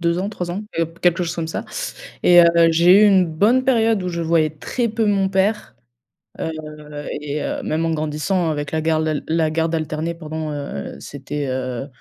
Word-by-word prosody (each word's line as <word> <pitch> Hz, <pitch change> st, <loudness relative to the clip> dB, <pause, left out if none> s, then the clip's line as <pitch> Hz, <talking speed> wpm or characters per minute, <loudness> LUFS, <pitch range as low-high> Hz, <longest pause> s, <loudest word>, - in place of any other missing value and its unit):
2 170 Hz, +1 st, +1 dB
ans, 195 Hz, +2 st, -2 dB
3 180 Hz, -4 st, -5 dB
ans 195 Hz, +4 st, -4 dB
et 165 Hz, -, +2 dB
heu, 165 Hz, -, 0 dB
quelque 175 Hz, 0 st, +2 dB
chose 170 Hz, 0 st, -3 dB
comme 165 Hz, -1 st, -2 dB
ça 165 Hz, -, -4 dB, 0.6 s
et 175 Hz, -1 st, +8 dB
heu, -, -, +7 dB, 0.3 s
j'ai 175 Hz, +5 st, +6 dB
eu -, -, +7 dB
une 190 Hz, -2 st, +5 dB
bonne 210 Hz, +11 st, +2 dB
période 225 Hz, -6 st, +2 dB
où 180 Hz, -, -3 dB
je 170 Hz, -1 st, -3 dB
voyais 160 Hz, -1 st, +2 dB
très 230 Hz, -, -3 dB
peu 225 Hz, 0 st, 0 dB
mon 195 Hz, -2 st, +2 dB
père, 195 Hz, -, 0 dB, 0.6 s
heu, 160 Hz, -, -2 dB, 0.7 s
et 150 Hz, 0 st, -3 dB
heu, -, -, -3 dB
même 160 Hz, +2 st, -1 dB
en 165 Hz, -, 0 dB
grandissant 155 Hz, +3 st, -1 dB
avec 145 Hz, -1 st, -4 dB
la 160 Hz, 0 st, -1 dB
garde 160 Hz, 0 st, +1 dB
al 155 Hz, -2 st, -2 dB
la 160 Hz, -1 st, +1 dB
garde 165 Hz, +1 st, 0 dB
alternée 155 Hz, +1 st, -2 dB
pendant, 155 Hz, -1 st, -5 dB
heu, 140 Hz, -, -5 dB
c'était, 145 Hz, +1 st, -5 dB
heu 130 Hz, 0 st, -3 dB
165 Hz, 205 wpm, -20 LUFS, 155-185 Hz, 0.7 s, et